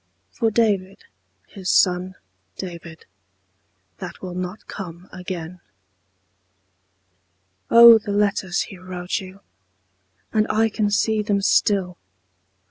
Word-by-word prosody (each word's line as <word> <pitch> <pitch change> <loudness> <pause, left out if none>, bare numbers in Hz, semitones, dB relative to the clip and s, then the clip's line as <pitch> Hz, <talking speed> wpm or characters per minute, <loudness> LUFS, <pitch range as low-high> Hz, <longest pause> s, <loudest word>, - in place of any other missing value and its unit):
For 225 - 0
David, 205 - 0 0.4
his 190 -3 -7
son 185 0 +2 0.4
David, 170 -3 -9 0.9
That - - -8
will 185 -1 -7
not 180 +3 -6
come 180 -2 -9
again. 180 -1 -7 2.1
Oh, 235 -1 +9
the 210 - -10
letters 200 -3 0
he 195 - -7
wrote 180 -1 -4
you, 190 0 -12 0.9
And 215 -1 +2
I 225 +1 +2
can 210 -1 -1
see 215 +1 +1
them 205 -1 0
still. 190 -4 +1
190 Hz, 105 wpm, -22 LUFS, 180-210 Hz, 2.1 s, Oh